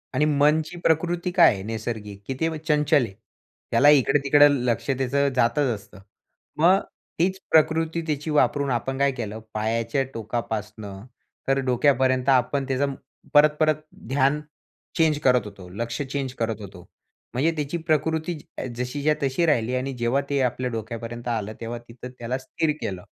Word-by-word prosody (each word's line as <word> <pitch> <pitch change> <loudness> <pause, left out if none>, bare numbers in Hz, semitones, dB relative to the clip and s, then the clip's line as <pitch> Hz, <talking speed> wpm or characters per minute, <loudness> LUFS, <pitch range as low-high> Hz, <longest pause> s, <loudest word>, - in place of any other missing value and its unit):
आणि 150 - +3
मनची 150 +3 +2
प्रकृती 175 +2 +1
काय 175 - +6
आहे 95 - -6
नैसर्गिक 110 -2 -5
की 135 - -2
ते 160 -1 0
चंचल 150 -2 +2
आहे. 95 - -10 0.6
त्याला 145 +1 +6
इकडं-तिकडं 145 +1 +5 0.2
लक्ष 120 +3 -1
त्याचं 135 +2 +1
जातच 130 +3 +2
असतं. 100 -2 -14 0.6
मग 180 +5 +5 0.4
तीच 190 +2 +1
प्रकृती 160 +1 +3
त्याची 150 +1 -2
वापरून 140 0 +2
आपण 135 +3 -2
काय 140 0 +3
केलं 110 -4 -5
पायाच्या 115 +4 0
टोकापासून 110 -1 -4 0.6
तर 135 0 +2
डोक्यापर्यंत 130 0 +2
आपण 135 +2 +2
त्याचा 135 +1 +1 0.5
परत-परत 150 +1 +5 0.3
ध्यान 140 +2 +2 0.6
चेंज 155 -2 +3
करत 125 -4 +4
होतो. 100 -3 -10
लक्ष 115 +7 -4
चेंज 135 -1 -3
करत 110 -2 -2
होतो. 95 -3 -11 0.5
म्हणजे 145 +7 +2
त्याची 150 +3 -2
प्रकृती 160 +1 0
ज 130 - -8
जशीच्या 140 +5 0
तशी 135 +5 +1
राहिली 125 -5 +1
आणि 135 +1 -2
जेव्हा 120 +4 +1
ते 140 -1 +1
आपल्या 125 0 -1
डोक्यापर्यंत 115 +2 -6
आलं 110 -2 -2
तेव्हा 115 +1 -4
तिथं 125 +2 -10
त्याला 120 +2 -2
स्थिर 155 +3 -1
केलं 95 -3 -4
135 Hz, 150 wpm, -24 LUFS, 115-150 Hz, 0.6 s, काय